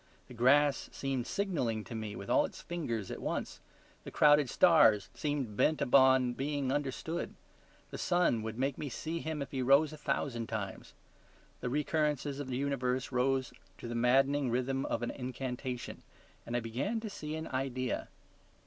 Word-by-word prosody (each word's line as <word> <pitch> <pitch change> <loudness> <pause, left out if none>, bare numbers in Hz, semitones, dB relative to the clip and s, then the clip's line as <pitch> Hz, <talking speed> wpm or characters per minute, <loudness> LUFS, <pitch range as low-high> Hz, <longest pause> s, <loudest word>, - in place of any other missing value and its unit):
The - - -9
grass 140 +4 +3
seemed 135 -3 -3
signalling 130 - -1
to - - -9
me 110 -2 -4
with - - -8
all - - +4
its - - -6
fingers 115 - -4
at - - -6
once; - - -3 0.4
the - - -7
crowded 150 -3 +5
stars 115 - +5
seemed 145 -8 -2
bent 155 +7 +2
upon 130 -1 +5
being 140 0 -2
understood. 145 +4 -3 0.6
The - - -6
sun 175 -10 +2
would 110 0 -5
make 135 +1 -1
me 145 - -3
see 160 +6 -4
him 155 -3 -3
if - - -11
he 135 - -2
rose 140 +4 +4
a - - -8
thousand 120 -6 -2
times. 100 -4 -5 0.6
The 125 - -3
recurrences 150 0 0
of 145 - -4
the 125 -1 -2
universe 130 -2 -1
rose 130 0 +1 0.2
to - - -8
the 120 - -4
maddening 135 +3 +3
rhythm 130 +3 -1
of 115 - -2
an 120 - -1
incantation, 125 -1 -5 0.5
and 120 +1 -1
I - - -1
began 125 - -2
to 220 - -5
see 155 -6 -5
an 160 0 -5
idea. 130 -1 -2
130 Hz, 170 wpm, -32 LUFS, 120-145 Hz, 0.6 s, crowded